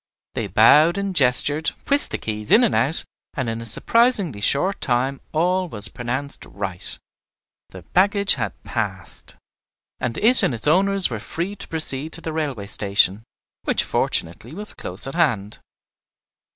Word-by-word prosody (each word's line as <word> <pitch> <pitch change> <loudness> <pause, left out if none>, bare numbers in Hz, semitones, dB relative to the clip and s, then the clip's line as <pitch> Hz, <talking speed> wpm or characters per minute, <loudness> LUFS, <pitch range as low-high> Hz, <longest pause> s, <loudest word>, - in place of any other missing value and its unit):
They - - -4
bowed 160 +5 +4
and 200 -1 -4
gestured, 145 +2 +4 0.2
whisked 285 +1 +6
the - - -2
keys 105 -1 -4
in 235 - +6
and 235 - +2
out, 150 +5 +1 0.3
and 130 -3 -3
in 115 0 -4
a 115 - -5
surprisingly 200 - +3
short 160 - +2
time 130 +2 -1
all 180 +3 0
was 110 -4 -3
pronounced 130 +4 -5
right, 95 -2 -7 0.7
the 95 -2 -12
baggage 200 - +2
had - - -5
"passed," 100 - -6 0.6
and 120 -1 -4
it 240 +4 +5
and 125 - 0
its 115 - -3
owners 195 +2 +3
were 115 - -4
free 170 - -5
to - - -11
proceed 155 -1 -3
to 165 - -6
the 160 - -6
railway 140 -10 -4
station, 100 0 +1 0.4
which - - 0
fortunately 110 - -3
was 210 +2 -3
close 90 +3 -5
at 135 - -7
hand. 120 - -1
140 Hz, 155 wpm, -21 LUFS, 110-180 Hz, 0.7 s, whisked